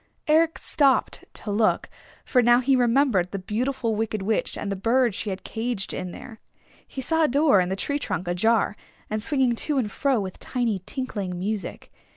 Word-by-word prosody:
Eric 320 Hz, +1 st, +3 dB
stopped 275 Hz, -3 st, +1 dB
to 210 Hz, -, -4 dB
look, 215 Hz, +1 st, +2 dB, 0.4 s
for 250 Hz, -, +3 dB
now 240 Hz, +1 st, +5 dB
he 265 Hz, +2 st, +3 dB
remembered 240 Hz, -6 st, +3 dB
the 200 Hz, -, -4 dB
Beautiful 230 Hz, +4 st, -2 dB
Wicked 215 Hz, -2 st, -2 dB
Witch 220 Hz, +2 st, -1 dB
and 200 Hz, -, -4 dB
the -, -, -1 dB
bird 235 Hz, 0 st, +3 dB
she 210 Hz, +1 st, -4 dB
had 190 Hz, -1 st, -5 dB
caged 225 Hz, -3 st, -3 dB
in 185 Hz, 0 st, -4 dB
there. 220 Hz, +5 st, -10 dB, 0.5 s
He 265 Hz, -, -6 dB
saw 320 Hz, +5 st, +1 dB
a -, -, +5 dB
door 280 Hz, -6 st, +4 dB
in 180 Hz, -, -1 dB
the 190 Hz, -, -1 dB
tree 285 Hz, +8 st, -2 dB
trunk 180 Hz, -, -3 dB
ajar, 210 Hz, +4 st, +2 dB, 0.4 s
and 215 Hz, 0 st, -1 dB
swinging 260 Hz, -1 st, +1 dB
to 295 Hz, +3 st, -1 dB
and 220 Hz, -6 st, 0 dB
fro 270 Hz, 0 st, +1 dB
with 190 Hz, -2 st, -5 dB
tiny 235 Hz, -6 st, -1 dB
tinkling 205 Hz, -9 st, -3 dB
music. 200 Hz, +2 st, -4 dB
230 Hz, 190 wpm, -25 LUFS, 200-265 Hz, 0.5 s, now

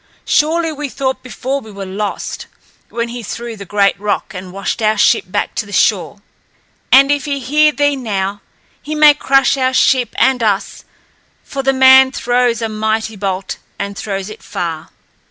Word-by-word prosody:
Surely 325 Hz, +2 st, +1 dB
we 295 Hz, -1 st, -5 dB
thought 265 Hz, 0 st, -3 dB
before 260 Hz, +2 st, -4 dB
we 220 Hz, -, -13 dB
were 200 Hz, -1 st, -7 dB
lost, 200 Hz, +2 st, -5 dB, 0.4 s
when 235 Hz, 0 st, -3 dB
he 240 Hz, +1 st, -6 dB
threw 235 Hz, +1 st, -6 dB
the 200 Hz, -2 st, -10 dB
great 200 Hz, -1 st, +1 dB
rock 205 Hz, 0 st, -2 dB
and 185 Hz, -1 st, -8 dB
washed 195 Hz, +4 st, -4 dB
our 215 Hz, 0 st, +2 dB
ship 220 Hz, +1 st, +3 dB
back 205 Hz, +3 st, -2 dB
to -, -, -2 dB
the 205 Hz, -, -13 dB
shore. 200 Hz, 0 st, 0 dB, 0.7 s
And 275 Hz, +1 st, +6 dB
if 290 Hz, 0 st, 0 dB
he 280 Hz, -1 st, -2 dB
hear 300 Hz, +4 st, +3 dB
thee 290 Hz, -1 st, +1 dB
now, 205 Hz, -5 st, -3 dB, 0.4 s
he 310 Hz, -, -5 dB
may 300 Hz, -1 st, +7 dB
crush 275 Hz, -1 st, +2 dB
our 260 Hz, 0 st, 0 dB
ship 250 Hz, -4 st, +2 dB
and 265 Hz, -2 st, +2 dB
us, 205 Hz, -3 st, -1 dB, 0.6 s
for 275 Hz, -, -5 dB
the 270 Hz, 0 st, +2 dB
man 265 Hz, 0 st, +6 dB
throws 245 Hz, -2 st, 0 dB
a -, -, 0 dB
mighty 220 Hz, 0 st, -2 dB
bolt 195 Hz, -1 st, -4 dB, 0.2 s
and 200 Hz, 0 st, -4 dB
throws 195 Hz, -1 st, -4 dB
it -, -, -11 dB
far." 165 Hz, -2 st, -5 dB
235 Hz, 175 wpm, -16 LUFS, 200-270 Hz, 0.7 s, may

